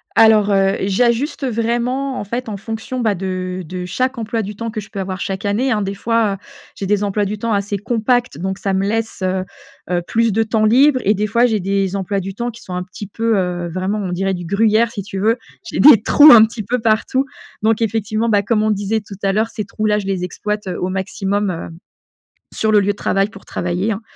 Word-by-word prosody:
Alors, 220 -2 +5
heu, 195 0 +3
j'ajuste 235 +8 +1
vraiment 245 +3 -1
en - - -3
fait 235 +3 -4
en 205 - -4
fonction, 225 +5 -5
bah, 220 -3 +1
de 185 0 -4
de 180 +2 -5
chaque 255 +7 -1
emploi 225 0 -2
du 210 0 -6
temps 230 +1 -4
que 215 -1 -4
je 200 - -13
peux 200 - -6
avoir 185 -1 -4
chaque 195 +2 -4
année, 240 +6 +1
hein, 210 -1 +1
des 195 +1 -3
fois, 225 0 +1
heu, - - -6 0.4
j'ai 195 - -4
des 205 0 +1
emplois 205 0 0
du 210 +2 -3
temps 230 +1 -1
assez 200 0 -1
compacts 235 - 0
donc 190 +2 -3
ça 195 -1 -2
me 195 +1 0
laisse, 225 -1 -2
heu, 185 0 -1 0.5
heu, 175 -1 +1
plus 230 -1 +2
de 225 - +2
temps 220 0 +1
libre 260 +4 +5
et 205 - +3
des 210 +1 -1
fois 235 +3 +3
j'ai 220 -3 +1
des 195 0 -1
emplois 195 +1 -1
du 195 +1 -5
temps 240 +3 -3
qui 235 0 -11
sont 185 - -8
un 180 0 -2
petit 185 +3 -9
peu, 225 +1 0
heu, 175 -2 -1
vraiment 185 +4 -2
on 185 -3 -3
dirait 190 +2 -1
du 175 -1 -5
gruyère 220 +4 +2
si 200 -4 -5
tu 195 0 -6
veux, 225 +4 +2 0.3
j'ai - - -3
des 275 -8 +8
trous 295 +6 +7
un 225 -2 +9
petit 225 0 -2
peu 245 +5 -1
partout. 225 +4 +1 0.4
Donc 225 +1 +2
effectivement, 220 +1 0
bah, 205 -2 +3
comme 215 +1 +1
on 215 - +2
disait 205 +2 -1
tout 205 -1 -10
à 195 - +2
l'heure 220 +3 0
ces 215 - -4
trous-là 210 +1 0
je 195 - -6
les 190 -2 -1
exploite 210 +3 -4
au 180 0 -2
maximum, 195 +1 -1
heu, 165 -1 -6 0.8
sur 220 0 0
le 205 - +6
lieu 195 - -2
de 205 - -9
travail 195 +1 +1
pour 195 -2 -14
travailler, 180 +5 -2
hein. 200 - -6
210 Hz, 240 wpm, -18 LUFS, 195-225 Hz, 0.8 s, un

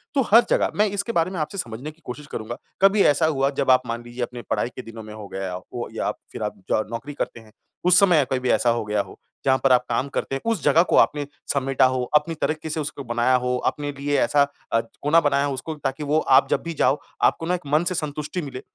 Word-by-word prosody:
तो 275 - +4
हर 230 +3 +8
जगह - - +2
मैं 210 +1 +3
इसके 200 +3 -2
बारे 170 -3 +1
में 185 - -4
आपसे 155 +6 -3
समझने 125 -1 -5
की 160 +2 -27
कोशिश 140 +4 -7
करूँगा। 115 +2 -5 0.2
कभी 195 +1 +5
ऐसा 145 +2 +4
हुआ 135 -3 +2
जब 135 -2 +3
आप 130 - +5
मान 115 +1 -4
लीजिए 120 +1 -5
अपने 120 0 -6
पढ़ाई - - 0
के - - -5
दिनों 115 -2 -10
में 105 0 -10
हो 105 -1 -9
गया 95 -1 -5
हो 90 0 -6
या - - -1
फ़िर - - -9
आप - - -3
जॉ - - +2
नौकरी 115 +6 -5
करते 130 - -4
हैं 110 -1 -17 0.3
उस 180 0 +6
समय 175 -8 +5
कभी 130 - +1
भी 130 0 -2
ऐसा 120 - +3
हो 115 -1 +1
गया 105 -1 0
हो? - - -11 0.3
जहाँ 130 -1 +4
पर 135 - +4
आप 125 -1 +5
काम 120 +3 0
करते 135 - -3
हैं, 135 - -4
उस 215 -8 -2
जगह 150 +3 +5
को - - +3
आपने 145 -1 +3 0.3
समेटा 135 -1 +2
हो, 130 -1 +1
अपनी 150 +2 +2
तरक्की 155 0 -2
से 155 - -2
उसको 145 -1 -5
बनाया 120 +1 +2
हो, 125 0 0
अपने 145 -1 -1
लिए 145 0 0
ऐसा 145 +3 +4 0.3
अ, 115 - +5 0.2
कोना 150 +3 +4
बनाया 145 -1 +2
उसको 140 +4 -4
ताकि 135 +3 -2
वो 150 +2 +2
आप 135 -2 +4
जब - - 0
भी 170 - -4
जाओ, 145 -1 +2 0.2
आपको 165 - +2
ना 180 +2 +1
एक 180 - -8
मन 155 +3 +4
से 185 - -3
संतुष्टि 150 +1 -3
मिले 135 -4 -7
140 Hz, 255 wpm, -23 LUFS, 125-155 Hz, 0.3 s, हर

